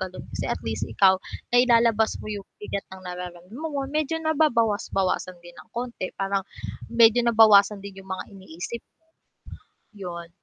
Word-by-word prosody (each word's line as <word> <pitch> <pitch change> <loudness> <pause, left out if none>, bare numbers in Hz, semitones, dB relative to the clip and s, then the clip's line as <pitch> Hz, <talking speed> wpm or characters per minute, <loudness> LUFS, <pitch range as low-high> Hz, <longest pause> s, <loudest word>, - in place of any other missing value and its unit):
gano'n, 185 -1 -5
kasi - - -3
at - - -1
least 110 -1 -3
ikaw, 190 - +5 0.4
nailalabas 230 -3 +4
mo - - -9
'yong 205 -2 -5 0.2
bigat 200 -1 -3
ng 190 0 -10
nararam 180 -1 -7
mo 315 +5 -4
mo, 280 -1 -1
medyo 305 +2 -1
nababawas-bawasan 225 - +1
din 175 0 -12
ng - - -18
konti, 240 -6 -3
parang 195 0 0 0.5
medyo 230 0 +6
nabawasan 215 -3 +6
din 195 -1 -9
'yong 190 - -18
mga 185 -1 -3
iniisip. 190 +4 -7 1.1
'Yon. 175 -4 -7
200 Hz, 150 wpm, -25 LUFS, 185-235 Hz, 1.1 s, medyo